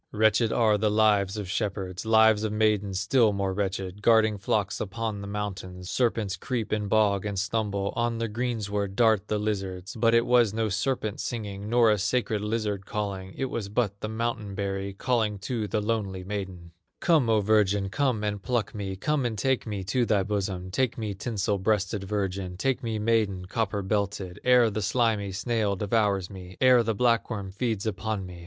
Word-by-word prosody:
Wretched 110 +1 +3
are 110 -3 +3
the 105 0 +2
lives 105 -2 +3
of 105 -2 -4
shepherds, 95 0 -3
Lives 110 -1 +5
of 110 - -1
maidens 105 -3 +1
still 110 +2 +3
more 100 -1 -1
wretched, 95 0 -3
Guarding 110 -2 +4
flocks 105 +1 -1
upon 110 0 -3
the 100 - -6
mountains; 95 -3 -5
Serpents 110 -6 0
creep 115 +2 -3
in 105 -1 -1
bog 100 -2 +2
and 105 -1 -3
stubble, 100 -1 -1
On 120 0 0
the 115 0 -1
greensward 105 -4 -2
dart 110 -3 +3
the 105 - 0
lizards; 95 -3 -3
But 115 0 +3
it 115 0 +4
was 120 -4 +3
no 110 -1 0
serpent 110 +1 -1
singing, 105 -4 -4
Nor 115 -1 +5
a 105 - +1
sacred 105 0 0
lizard 105 -2 -2
calling, 100 -3 -4
It 135 -1 -2
was 105 -4 -3
but 100 -2 -1
the - - -2
mountain 110 -3 -3
berry 100 0 -3
Calling 110 -1 0
to 110 0 -2
the 105 +1 -1
lonely 105 -4 -2
maiden: 95 -3 -6 0.3
"Come, 155 -9 +3
O 110 -1 +4
virgin, 100 -1 +2
come 125 -2 0
and 105 -1 -2
pluck 120 -2 -1
me, 100 -2 -4
Come 145 +8 0
and 115 -3 -2
take 130 +3 0
me 100 -3 -3
to 115 +5 0
thy 100 -3 +2
bosom, 95 -3 -3
Take 125 +3 0
me, 110 -3 -3
tinsel 105 0 -2
breasted 100 0 0
virgin, 95 -2 -3
Take 135 +6 0
me, 115 -2 -2
maiden, 105 -4 +1
copper 100 0 -2
belted, 100 -2 -2
Ere 125 -3 +5
the 110 +1 -2
slimy 105 -2 +1
snail 105 0 0
devours 100 -2 +1
me, 95 -1 -11
Ere 130 -1 +6
the 115 -1 -1
black 115 +1 +2
worm 100 -4 -4
feeds 110 0 -2
upon 110 -1 -2
me. 90 -1 -10
105 Hz, 185 wpm, -27 LUFS, 100-115 Hz, 0.3 s, Ere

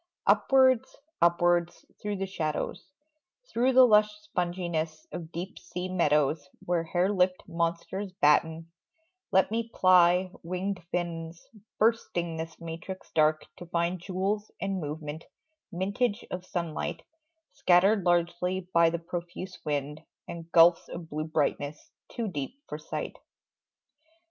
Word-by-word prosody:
Upwards, 260 -1 +4 0.3
upwards 175 0 +2 0.2
through 210 0 -2
the 195 0 -2
shadows, 155 -5 -3 0.6
Through 255 +3 +3
the 255 0 +9
lush 210 -2 +5
sponginess 175 -5 -2
of 170 -2 -7
deep 175 +3 -6
sea 180 +1 -5
meadows 150 -4 +1 0.2
Where 170 -1 0
hare 180 +4 +1
lipped 185 -1 +2
monsters 170 +4 -2
batten, 160 0 +2 0.6
let 190 +2 +3
me 230 +1 -1
ply 180 -1 +5
Winged 185 +2 -3
fins, 170 -1 -4 0.3
bursting 175 -7 +1
this 160 0 -6
matrix 170 +3 -7
dark 155 0 +3
to 175 - -10
find 170 +2 0
Jewels 195 +4 -2
and 195 -1 -2
movement, 150 +1 -6 0.5
mintage 200 +5 -1
of 180 0 -5
sunlight 170 -3 -3 0.5
Scattered 190 +3 +4
largely 175 +1 +1
by 170 -1 +6
the 170 - -2
profuse 175 +2 -6
wind, 150 0 -2 0.3
And 170 0 -8
gulfs 165 0 +6
of 170 -2 -8
blue 155 +1 -2
brightness, 150 -1 -2 0.2
too 230 -2 -3
deep 180 - -5
for - - -6
sight. - - -5
175 Hz, 125 wpm, -28 LUFS, 165-190 Hz, 0.6 s, the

